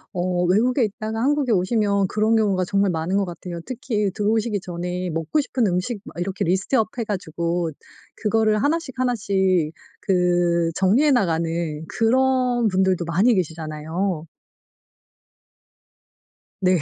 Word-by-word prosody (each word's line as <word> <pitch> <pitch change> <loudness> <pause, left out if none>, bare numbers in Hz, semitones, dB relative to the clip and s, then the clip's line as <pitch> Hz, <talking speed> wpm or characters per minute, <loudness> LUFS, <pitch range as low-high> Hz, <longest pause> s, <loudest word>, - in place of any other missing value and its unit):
어 180 0 0
외국에 235 +8 +2
있다가 220 +2 -4
한국에 285 -3 +1
오시면 200 0 +2
그런 215 +3 +1
경우가 195 -4 +2
정말 200 0 +1
많은 165 +4 -1
것 200 - +1
같아요. 175 -1 -7
특히 235 -6 -2
들어오시기 210 +1 0
전에 180 0 -4
먹고 165 - 0
싶은 255 -4 -1
음식 190 +4 -1
막 - - -10
이렇게 185 +1 -2
리스트업 190 +6 +1
해 230 - 0
가지고 170 -4 -2 0.5
그거를 215 0 +1
하나씩 305 0 0
하나씩 190 -9 +1 0.3
그 175 -2 +2
정리해 220 +11 +3
나가는 175 - +2 0.4
그런 250 +1 +2
분들도 185 -2 +1
많이 190 +9 +3
계시잖아요. 160 0 -3 2.3
네. 185 -2 +3
195 Hz, 295 characters per minute, -22 LUFS, 175-225 Hz, 2.3 s, 정리해